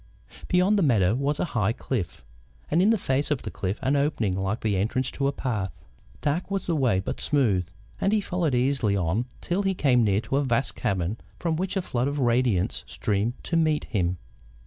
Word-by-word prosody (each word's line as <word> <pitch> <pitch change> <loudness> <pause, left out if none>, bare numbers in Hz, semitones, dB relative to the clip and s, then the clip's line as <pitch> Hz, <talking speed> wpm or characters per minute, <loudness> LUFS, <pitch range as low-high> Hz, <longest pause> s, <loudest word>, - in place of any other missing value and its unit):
Beyond 190 +3 +3
the - - +2
meadow 110 - +3
was 140 +4 0
a - - +1
high 110 -2 +2
cliff, 105 - -4 0.5
and 165 - +4
in 200 - +4
the 225 - +4
face 140 -5 0
of 150 -4 -1
the - - -5
cliff 95 +2 -3
an 135 +2 +2
opening 140 -9 +1
like 95 +3 -2
the 105 -3 +1
entrance 115 +7 0
to 140 - -1
a - - +2
path. 110 -9 -2 0.5
Dark 155 +6 -1
was 195 -2 -2
the 170 - 0
way, 125 -10 +2
but 95 - -4
smooth, 110 - +2 0.3
and 195 - +2
he 215 - +3
followed 175 -8 0
easily 125 -5 +1
on 95 +6 0 0.2
till 180 +3 0
he 195 -1 0
came 125 -7 +3
near 100 -2 +3
to 135 - -1
a 145 - +2
vast 130 0 0
cavern 100 -2 -1 0.2
from 165 -2 -1
which 190 +4 -2
a 190 - 0
flood 125 -5 -1
of 145 +1 -2
radiance 120 -7 +1
streamed 105 +3 -1
to 170 - -2
meet 155 -2 +2
him. 90 -5 -1
130 Hz, 210 wpm, -26 LUFS, 105-155 Hz, 0.5 s, and